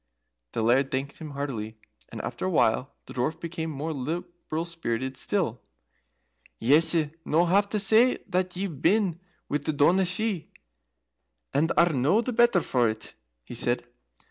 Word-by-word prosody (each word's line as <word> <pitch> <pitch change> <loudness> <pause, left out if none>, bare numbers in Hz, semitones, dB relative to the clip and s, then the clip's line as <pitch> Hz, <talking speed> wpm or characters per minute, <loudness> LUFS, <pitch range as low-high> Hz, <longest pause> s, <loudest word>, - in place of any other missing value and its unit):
The 115 - -1
Laird 130 +4 +3
thanked 135 +2 -3
him 160 -2 -7
heartily, 110 -6 -4 0.3
and - - -6
after - - -4
a - - +1
while 60 - +1
the - - -10
Dwarf 155 +6 -1
became 165 -1 -4
more 155 +2 -4
liberal 165 +3 -4
spirited 130 -6 -3
still. 145 - -2 1.0
"Yese 155 +4 +4
no 165 +3 +2
have 200 +3 +3
to 210 - -1
say 220 +5 +5
that 180 0 -1
ye've 180 -7 -4
been 195 -5 +2 0.3
with 145 0 -2
the 155 - 0
Daoiné 175 +6 +4
Shi 190 -1 -2 1.0
and 160 +4 +2
are 170 -1 +5
no 145 - +3
the 245 +2 -2
better 235 -5 +4
for 120 -6 +2
it," 110 0 -6 0.3
he - - -10
said. - - 0
160 Hz, 155 wpm, -27 LUFS, 135-185 Hz, 1.0 s, say